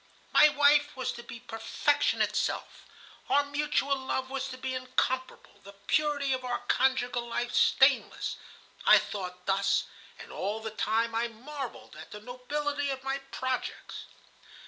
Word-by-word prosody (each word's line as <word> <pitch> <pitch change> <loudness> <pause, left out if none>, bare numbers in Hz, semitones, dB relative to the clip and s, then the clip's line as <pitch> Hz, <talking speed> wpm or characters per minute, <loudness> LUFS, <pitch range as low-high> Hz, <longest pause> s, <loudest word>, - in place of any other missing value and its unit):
My 300 - +7
wife 290 -1 +4
was 260 - -1
to 240 - -8
be 240 0 -9
perfection 250 +5 +1
itself, - - -2 0.4
our 285 - +4
mutual 285 -1 0
love 265 0 -3
was 270 0 -2
to 255 -1 -7
be 260 0 -4
incomparable, 255 -3 -2
the 200 +1 -12
purity 290 -1 +1
of 255 0 -3
our 245 -1 -1
conjugal 250 -2 +1
life 240 +1 -2
stainless. - - +3 0.5
I - - +10
thought 180 -2 -5
thus, 195 0 +2 0.3
and - - -11
all 205 +3 -3
the 220 0 -5
time 225 +2 0
I 230 +1 +1
marvelled 260 +3 -8
at - - -10
the 210 - -8
nobility 285 +5 -3
of 265 -1 -4
my 270 +1 -1
projects. 260 -1 -4
260 Hz, 145 wpm, -29 LUFS, 230-285 Hz, 0.5 s, I